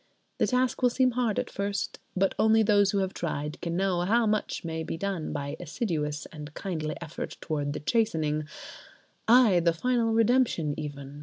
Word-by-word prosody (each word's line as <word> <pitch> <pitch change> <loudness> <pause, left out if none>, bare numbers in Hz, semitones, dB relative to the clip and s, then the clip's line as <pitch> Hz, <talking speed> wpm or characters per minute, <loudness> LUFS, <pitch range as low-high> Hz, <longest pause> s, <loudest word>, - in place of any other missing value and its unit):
The - - +3
task 255 0 +1
will 250 - +5
seem 255 +1 +2
hard 235 -3 0
at - - -2
first; 200 0 -3 0.2
but 195 +1 +2
only 220 0 +5
those 205 -2 +4
who 200 - 0
have 190 -1 0
tried 150 -2 -4
can 170 0 -2
know 190 -2 +1
how 225 +6 +3
much 215 -4 -1
may 160 -1 -3
be 160 - -4
done 190 -3 -3
by 140 0 -4
assiduous 155 - -3
and 150 -2 -8
kindly 155 -6 -3
effort 170 -2 -6
towards 145 -3 -2
the - - -4
chastening—ay! 175 +4 +1
the 170 0 +2
final 235 +5 +1
redemption 225 - +2
even! 145 -2 -7
180 Hz, 170 wpm, -28 LUFS, 155-225 Hz, 0.2 s, will